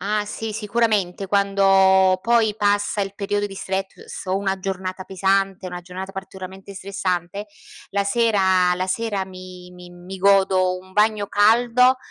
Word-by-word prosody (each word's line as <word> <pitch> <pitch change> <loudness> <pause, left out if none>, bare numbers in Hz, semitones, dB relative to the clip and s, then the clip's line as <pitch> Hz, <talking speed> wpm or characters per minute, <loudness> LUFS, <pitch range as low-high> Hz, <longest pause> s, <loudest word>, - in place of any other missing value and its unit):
Ah, 210 +1 -1
sì 215 +1 -5
sicuramente 210 -3 -1
quando 195 -1 +4
poi 230 -3 +2
passa 205 0 +1
il 195 0 -3
periodo 205 0 -1
di 195 - -10
stress 190 0 -5
o 185 +1 0
una 195 -1 -1
giornata 185 0 -4
pesante, 195 0 0
una 180 0 -6
giornata 185 +2 -8
particolarmente 190 0 -9
stressante, 195 0 -3 0.4
la 200 0 0
sera 190 -5 +2
la 185 +1 -2
sera 205 -1 -2
mi 185 -1 -12
mi 180 0 -13
mi 175 +2 -10
godo 190 -1 +3
un 185 +1 -17
bagno 210 0 +2
caldo 240 +5 +4
195 Hz, 145 wpm, -22 LUFS, 185-205 Hz, 0.4 s, quando